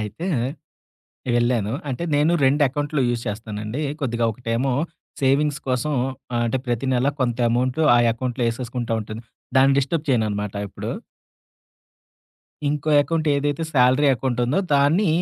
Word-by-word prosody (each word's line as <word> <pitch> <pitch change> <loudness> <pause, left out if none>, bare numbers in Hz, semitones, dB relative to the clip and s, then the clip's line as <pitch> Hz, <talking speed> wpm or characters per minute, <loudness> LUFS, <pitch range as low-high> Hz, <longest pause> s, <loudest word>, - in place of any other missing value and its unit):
అయితే 105 - -5 1.1
వెళ్ళాను. 120 -3 +1 0.2
అంటే, 130 +3 -3
నేను 150 +3 +3
2 140 +3 +3
అకౌంట్లు 145 +2 -2
యూజ్ 120 -1 -1
చేస్తానండి. 105 +4 -4 0.2
కొద్దిగా 120 -4 -1
ఒకటేమో, 120 +3 -1 0.5
సేవింగ్స్ 145 +2 +2
కోసం, 130 +4 0 0.4
ఆహ్, 120 - +1
అంటే, 115 +3 0
ప్రతి 120 +1 -1
నెల 125 +2 +2
కొంత 120 -2 0
అమౌంటు 125 +5 +1
ఆ - - +5
అకౌంట్‌లో 125 +1 -2
ఏసేసుకుంటాంటను. 115 -2 -4 0.3
దాన్ని 135 +1 +5
డిస్టర్బ్ 145 +3 -1
చేయననమాట 105 -5 0
ఎప్పుడు. - - -6 1.8
ఇంకో 150 +1 -2
అకౌంటేదైతే 145 -1 0
సాలరీ 130 +2 +4
అకౌంటుందో 125 - 0
దాన్ని, 145 +8 +3
125 Hz, 120 wpm, -22 LUFS, 115-145 Hz, 1.8 s, ఆ